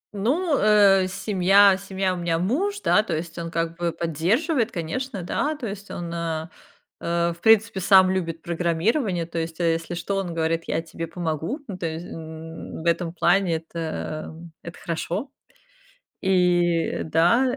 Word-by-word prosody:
Ну, 285 - +1
э, 200 -3 +5
семья 195 0 +4
семья- 190 -1 -2
у 180 - -4
меня 170 -1 0
муж, 370 - -1
да, 210 - +4
то 215 - -3
есть 160 +1 -5
он 165 0 -4
как 165 0 -2
бы 170 -1 -1
поддерживает, 220 - 0
конечно, 195 +4 -4
да. 300 - -1
То 255 - -6
есть 200 -1 -7
он, 170 -1 -5
а, 165 -1 -3 0.5
а, 170 0 0
в 170 - -17
принципе 220 0 +4
сам 190 0 +6
любит 165 -3 -3
программирование. 175 - 0
То 165 0 -4
есть 165 0 -4
если 165 0 0
что 195 +3 -2
он 175 -4 -3
говорит: 165 0 0
"Я 165 - 0
тебе 165 0 -6
помогу". 165 - -3
Ну 185 -3 -7
то 165 - -2
ес 160 +1 -5
э, - - -10
м, 160 0 -8
в - - -12
этом 170 0 +1
плане. 175 0 +2
Это, 165 +1 -6 0.5
м, 165 +1 -12
это 170 - -9
хорошо 175 - -4 0.9
и 175 -3 +2
да. 205 +12 +3
175 Hz, 165 wpm, -24 LUFS, 165-200 Hz, 0.9 s, сам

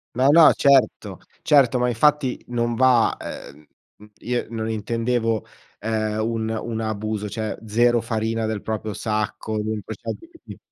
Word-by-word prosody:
No, 130 +2 +3
no, 160 +1 +8
certo, 140 -2 +2 0.2
certo. 130 -4 +4
Ma 125 - +1
infatti 135 +2 +1
non 120 -1 -1
va, 125 -2 +4
uhm, 75 +2 -9 0.3
mhmm, 105 0 -16
io 120 0 -2
non 110 -1 -4
intendevo, 115 +1 -1 0.3
ehm, 110 0 -2
un 110 -1 -2
un 115 0 -3
abuso. 110 -1 -3
Cioè, 110 +1 -4
0 120 +2 +2
farina 115 0 -2
del 110 -2 -3
proprio 110 -1 -4
sacco, 110 0 -3
comunque 110 0 -4
ChatGPT 335 - -9
115 Hz, 140 wpm, -22 LUFS, 110-120 Hz, 0.3 s, no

